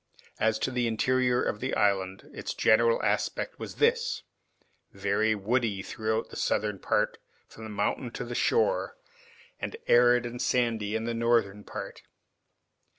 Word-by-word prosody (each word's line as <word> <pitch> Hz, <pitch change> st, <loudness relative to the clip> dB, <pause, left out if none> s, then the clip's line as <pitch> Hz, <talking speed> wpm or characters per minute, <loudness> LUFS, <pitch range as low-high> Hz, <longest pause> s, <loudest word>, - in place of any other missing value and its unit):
As 110 Hz, 0 st, +2 dB
to 130 Hz, -, -2 dB
the 125 Hz, -1 st, 0 dB
interior 125 Hz, +2 st, +2 dB
of 105 Hz, -, -2 dB
the 130 Hz, +3 st, -2 dB
island, 95 Hz, -2 st, 0 dB
its -, -, -5 dB
general 115 Hz, +1 st, +4 dB
aspect -, -, -1 dB
was -, -, -7 dB
this, 470 Hz, +2 st, +1 dB, 0.7 s
very 100 Hz, +3 st, +1 dB
woody 105 Hz, -1 st, 0 dB
throughout 110 Hz, +2 st, -2 dB
the -, -, -9 dB
southern 105 Hz, -2 st, 0 dB
part -, -, 0 dB, 0.3 s
from 110 Hz, -, -11 dB
the -, -, -7 dB
mountain 105 Hz, +4 st, -1 dB
to -, -, -4 dB
the 120 Hz, -, -6 dB
shore, 470 Hz, -, +1 dB, 0.6 s
and 455 Hz, -, -5 dB
arid 120 Hz, 0 st, +5 dB
and 120 Hz, +1 st, -5 dB
sandy 115 Hz, -4 st, 0 dB
in 110 Hz, -, -1 dB
the 115 Hz, 0 st, -2 dB
northern 115 Hz, -3 st, +1 dB
part. -, -, -7 dB
115 Hz, 150 wpm, -28 LUFS, 105-125 Hz, 0.7 s, arid